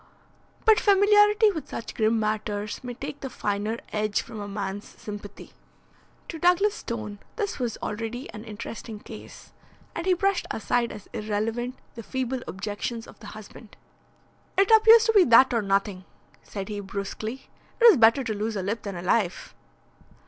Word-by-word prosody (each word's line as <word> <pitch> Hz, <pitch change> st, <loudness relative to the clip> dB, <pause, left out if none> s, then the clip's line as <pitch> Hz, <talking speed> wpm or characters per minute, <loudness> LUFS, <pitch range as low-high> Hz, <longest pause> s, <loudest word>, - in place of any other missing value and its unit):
But 440 Hz, -2 st, +6 dB
familiarity 415 Hz, +1 st, +5 dB
with 320 Hz, -5 st, -6 dB
such 230 Hz, -, -6 dB
grim 220 Hz, 0 st, +2 dB
matters 210 Hz, 0 st, -2 dB
may 245 Hz, -1 st, -6 dB
take 285 Hz, +3 st, -7 dB
the 270 Hz, -, -5 dB
finer 210 Hz, -1 st, -2 dB, 0.2 s
edge 210 Hz, -1 st, 0 dB
from 220 Hz, -, -9 dB
a 205 Hz, -, -5 dB
man's 200 Hz, 0 st, -5 dB
sympathy. 205 Hz, -3 st, -9 dB, 0.8 s
To 325 Hz, -, -6 dB
Douglas 360 Hz, +4 st, +3 dB
Stone 215 Hz, -, -6 dB, 0.2 s
this 410 Hz, -, -3 dB
was 240 Hz, -3 st, -2 dB
already 225 Hz, +5 st, -4 dB
an 210 Hz, -, -9 dB
interesting 220 Hz, 0 st, -7 dB
case, -, -, -12 dB, 0.4 s
and 335 Hz, +2 st, -4 dB
he 370 Hz, -, +4 dB
brushed 390 Hz, +1 st, 0 dB
aside 235 Hz, +1 st, 0 dB
as 210 Hz, -1 st, -10 dB
irrelevant 225 Hz, +3 st, -2 dB, 0.2 s
the 230 Hz, -, -8 dB
feeble 260 Hz, +2 st, -3 dB
objections 210 Hz, +4 st, -4 dB
of -, -, -15 dB
the 220 Hz, -, -11 dB
husband. 215 Hz, +1 st, -13 dB, 0.8 s
"It 390 Hz, +2 st, +4 dB
appears 445 Hz, +1 st, +7 dB
to 450 Hz, -, +2 dB
be 405 Hz, -3 st, +7 dB
that 245 Hz, +2 st, +6 dB
or 230 Hz, -, +2 dB
nothing," 195 Hz, -1 st, -1 dB, 0.4 s
said 195 Hz, -2 st, -7 dB
he 210 Hz, -2 st, -4 dB
brusquely. 200 Hz, +5 st, -6 dB, 0.3 s
"It 475 Hz, -, +5 dB
is 440 Hz, -9 st, +9 dB
better 230 Hz, +3 st, +5 dB
to 225 Hz, -3 st, -2 dB
lose 215 Hz, +2 st, -3 dB
a 195 Hz, -, -2 dB
lip 205 Hz, +3 st, -2 dB
than 200 Hz, -2 st, -6 dB
a 175 Hz, -, -6 dB
life." 185 Hz, -1 st, 0 dB
225 Hz, 165 wpm, -26 LUFS, 210-280 Hz, 0.8 s, is